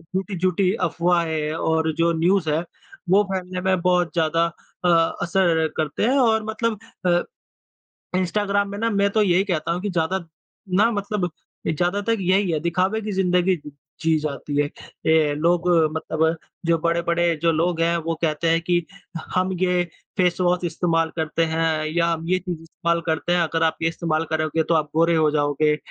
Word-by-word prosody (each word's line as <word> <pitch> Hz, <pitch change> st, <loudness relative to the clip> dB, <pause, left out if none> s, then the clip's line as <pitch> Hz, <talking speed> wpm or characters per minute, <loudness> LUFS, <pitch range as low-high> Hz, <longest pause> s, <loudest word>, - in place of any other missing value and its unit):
झूठी-झूठी 185 Hz, 0 st, 0 dB
अफ़वाहें 165 Hz, -2 st, 0 dB
और 160 Hz, 0 st, 0 dB
जो 170 Hz, 0 st, +3 dB
न्यूज़ 175 Hz, 0 st, +2 dB
है 155 Hz, +3 st, +1 dB, 0.5 s
वो 200 Hz, +3 st, +5 dB
फैलने 185 Hz, -1 st, -3 dB
में 190 Hz, 0 st, +1 dB
बहुत 180 Hz, -2 st, +1 dB
ज़्यादा 165 Hz, 0 st, +2 dB, 0.4 s
अ -, -, +4 dB, 0.3 s
असर 170 Hz, -3 st, +2 dB
करते 155 Hz, +2 st, -1 dB
हैं 255 Hz, +5 st, +3 dB
और 220 Hz, -3 st, +3 dB
मतलब 220 Hz, 0 st, -2 dB, 0.3 s
अ, 175 Hz, -1 st, +3 dB, 0.9 s
इंस्टाग्राम 200 Hz, +2 st, 0 dB
में 200 Hz, -, -5 dB
ना 230 Hz, +1 st, +1 dB
मैं 200 Hz, -2 st, +2 dB
तो 215 Hz, -, +2 dB
यही 185 Hz, -1 st, +3 dB
कहता 170 Hz, -5 st, -2 dB
हूँ 175 Hz, +1 st, -2 dB
कि 205 Hz, -, -2 dB
ज़्यादा 175 Hz, +1 st, 0 dB, 0.6 s
ना 215 Hz, +3 st, +5 dB
मतलब 205 Hz, -3 st, -2 dB, 0.4 s
ए, -, -, +1 dB
ज़्यादातर 200 Hz, +7 st, 0 dB
यही 190 Hz, 0 st, +2 dB
है 155 Hz, -, 0 dB
दिखावे 185 Hz, +6 st, 0 dB
की 210 Hz, 0 st, -4 dB
ज़िंदगी 185 Hz, -1 st, +2 dB, 0.5 s
जी 160 Hz, 0 st, +2 dB
जाती 145 Hz, -1 st, -4 dB
है। -, -, +1 dB, 0.4 s
ये 160 Hz, -2 st, +3 dB
लोग 170 Hz, +3 st, +1 dB, 0.3 s
मतलब 160 Hz, +1 st, 0 dB, 0.3 s
जो 165 Hz, 0 st, +3 dB
बड़े-बड़े 170 Hz, 0 st, +1 dB
जो 165 Hz, 0 st, +3 dB
लोग 165 Hz, +1 st, 0 dB
हैं 170 Hz, +1 st, +2 dB
वो 165 Hz, 0 st, -2 dB
कहते 165 Hz, 0 st, 0 dB
हैं 165 Hz, 0 st, +2 dB
कि 175 Hz, -1 st, 0 dB, 0.5 s
हम 185 Hz, +1 st, +1 dB
ये 180 Hz, -1 st, +2 dB, 0.3 s
फ़ेस 180 Hz, -2 st, +2 dB
वॉश 180 Hz, 0 st, +2 dB
इस्तेमाल 165 Hz, -1 st, 0 dB
करते 160 Hz, 0 st, 0 dB
हैं 160 Hz, -1 st, 0 dB
या 170 Hz, 0 st, +2 dB
हम 165 Hz, 0 st, -3 dB
ये 185 Hz, 0 st, +2 dB
चीज़ 175 Hz, -3 st, -5 dB
इस्तेमाल 170 Hz, +1 st, -2 dB
करते 160 Hz, +1 st, -1 dB
हैं 175 Hz, -, +3 dB
अगर 165 Hz, 0 st, 0 dB
आप 160 Hz, -1 st, +1 dB
ये 165 Hz, -, +2 dB
इस्तेमाल 165 Hz, -1 st, -1 dB
करोगे 155 Hz, 0 st, 0 dB
तो 170 Hz, -, 0 dB
आप 155 Hz, -2 st, +1 dB
गोरे 165 Hz, +1 st, +3 dB
हो 155 Hz, -1 st, +3 dB
जाओगे। 150 Hz, 0 st, +1 dB
170 Hz, 175 wpm, -22 LUFS, 160-185 Hz, 0.9 s, वो